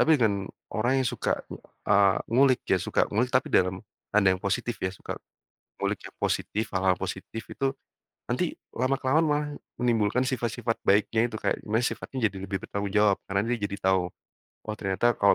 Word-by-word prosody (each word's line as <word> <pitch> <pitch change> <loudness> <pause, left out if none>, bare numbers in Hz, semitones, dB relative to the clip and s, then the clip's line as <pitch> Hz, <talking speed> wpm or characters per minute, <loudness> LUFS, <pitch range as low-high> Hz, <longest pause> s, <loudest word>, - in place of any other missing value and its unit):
Tapi 160 -1 +6
dengan 100 -6 +1 0.2
orang 120 +5 +2
yang 120 - +2
suka, - - -1 0.5
eee, 100 -1 +5
ngulik, 130 +2 +4
dia - - +3
suka - - +2
ngulik, 115 +5 +1
tapi 130 - +3
dalam 90 +2 +2 0.3
tanda 100 -3 +5
yang 95 - -3
positif 100 +4 -1
ya, 95 - 0
suka 95 - -7 0.6
ngulik - - -1
yang - - -10
positif, 110 - 0
hal-hal 95 0 +3
positif 115 - -5
itu 135 -1 -1 0.5
nanti - - -1 0.2
lama-kelamaan 135 +4 +2
malah 150 0 +1 0.3
menimbulkan 120 0 +2
sifat-sifat 120 -3 -1
baiknya 110 +3 +4
itu, 115 - -8
kayak - - -1
di - - -14
mana 110 +3 +1
sifatnya 125 -2 -1
jadi 95 - -9
lebih 95 0 -1
bertanggung 100 0 -3
jawab. 105 -2 +4
Karena 100 +1 +1
dia 120 - +1
jadi 100 - -5
tahu, 95 -2 +3 0.6
"Oh 110 - -4
ternyata 100 +5 +1
kalau 100 - +6
110 Hz, 175 wpm, -27 LUFS, 100-125 Hz, 0.6 s, Tapi